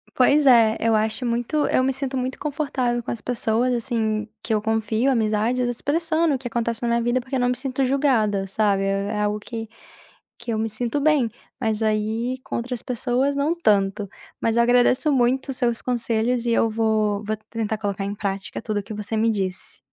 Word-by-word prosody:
Pois 285 +3 +4
é, 230 -4 +6
eu 225 0 +2
acho 220 +4 0
muito, 240 +6 0
eu 255 - +2
me 265 - +2
sinto 270 0 -4
muito 255 0 -2
confortável 275 -5 -1
com - - -8
as 235 - -3
pessoas, 240 +1 0
assim, 220 -3 -1 0.2
que 225 - -1
eu 215 - +1
confio, 220 +3 0
amizades, 230 +1 +1
expressando 315 +5 0
o - - -1
que 255 - -6
acontece 235 -1 -2
na - - +1
minha 235 0 +2
vida, 240 +2 +1
porque 260 +2 -5
eu - - +1
não 245 0 +2
me 250 - +1
sinto 270 +1 -2
julgada, 245 -8 +2
sabe, 195 0 +1
é 195 0 0
é - - -1
algo 210 0 0
que 225 +1 -6 0.7
que 235 -1 -5
eu 220 - -1
me 220 +1 0
sinto 235 +5 -2
bem, 285 -5 +3 0.3
mas 220 -3 0
aí 220 +3 0
com - - -4
outras 240 0 -4
pessoas 250 +3 0
não 290 +4 +1
tanto. 205 - +1 0.3
Mas 230 0 0
eu 235 - +5
agradeço 245 +4 +3
muito 260 +1 +1
seus 235 -2 0
conselhos 235 0 0
e 240 - 0
eu 230 0 +3
vou 215 -2 +1
vou 215 +1 -2
tentar 220 -1 -2
colocar 200 -2 -2
em 200 +1 -3
prática 195 -2 -4
tudo 215 -2 -2
que 215 - -9
você 210 +1 -4
me 225 +1 +3
disse. 190 -3 -4
235 Hz, 200 wpm, -23 LUFS, 215-255 Hz, 0.7 s, é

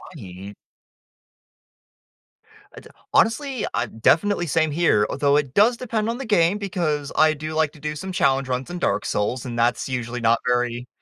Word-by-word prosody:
Right. 95 +2 -10 2.2
Uh, - - -9
d - - -16 0.2
honestly, 255 +1 +1
uh, 120 - -1
definitely, 175 - +2
same 160 0 +1
here, 145 -10 +2
although, 140 +1 +2
it 140 -3 -2
does 230 +4 +4
depend 225 -3 -2
on 235 - -2
the 270 - -6
game, 200 -3 +2
because 170 -8 -2
I 155 0 +4
do 155 +1 -6
like 155 -2 +1
to - - -16
do 150 +1 -4
some 190 +5 -6
challenge 135 -6 +1
runs 125 0 -3
in 175 0 -5
Dark - - 0
Souls, 115 +4 -2
and 120 -2 -5
that's 120 +3 +1
usually 125 -1 -4
not 115 0 +3
very 125 0 0
150 Hz, 175 wpm, -22 LUFS, 125-185 Hz, 2.2 s, does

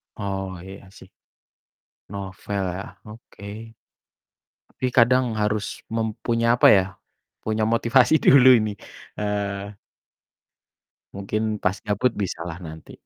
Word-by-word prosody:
Oh, 95 -3 -4
iya 95 0 -12
sih. 95 -2 -16 1.0
Novel 100 0 -5
ya, 95 +3 -8
oke, 105 -2 -13 1.2
tapi 130 - -6
kadang 120 -1 +3
harus 105 0 -2
mempunya 115 +1 0
apa - - +6
ya, 95 -2 +4 0.6
punya 110 0 0
motivasi 120 +6 +4
dulu 135 -3 +6
ini, 110 0 -1 0.5
eee 100 -1 -3 1.4
mungkin 100 +2 -3 0.2
pas 95 +2 +1
gabut 105 +4 +1
bisalah 85 -2 -5
nanti. 80 0 -10
105 Hz, 100 wpm, -23 LUFS, 95-115 Hz, 1.4 s, apa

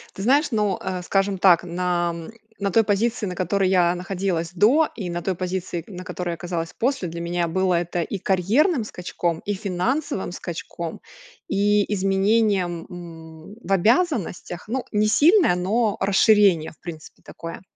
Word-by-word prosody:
Ты 195 - -5
знаешь, 280 +4 +3
ну, 210 -4 +1
э, 185 -1 -3
скажем 195 +1 0
так, 180 -2 +5
на, 175 0 -1
м, 165 +2 -8 0.3
на 200 -1 0
той 225 +4 +4
позиции 220 +2 0
на 185 - -3
которой 185 +1 +1
я 180 -2 +3
находилась 180 -2 -2
до, 250 - +4
и 190 -6 -5
на 175 0 -3
той 190 0 -1
позиции 180 -1 -3
н 200 - -10
на 180 - -7
которой 180 -1 -5
я - - -2
оказалась 165 0 -4
после, 260 -5 0
для 170 +1 -6
меня 170 0 -1
было 185 +2 +1
это 175 0 -1
и 195 - -3
карьерным 220 - +2
скачком, 175 -4 -3
и 205 - -1
финансовым 195 - -2
скачком, 170 -2 -6 0.5
и 205 +1 +2
изменением, 195 -2 +1
м, 165 0 -11
в - - -7
обязанностях. 210 - +1
Ну, 255 +3 -2
не 210 0 +2
сильное, 315 - +5
но 205 +5 0
расширение, 195 -4 +4
в - - -22
принципе, 160 -3 -10
такое. 165 0 -8
190 Hz, 165 wpm, -23 LUFS, 175-210 Hz, 0.5 s, так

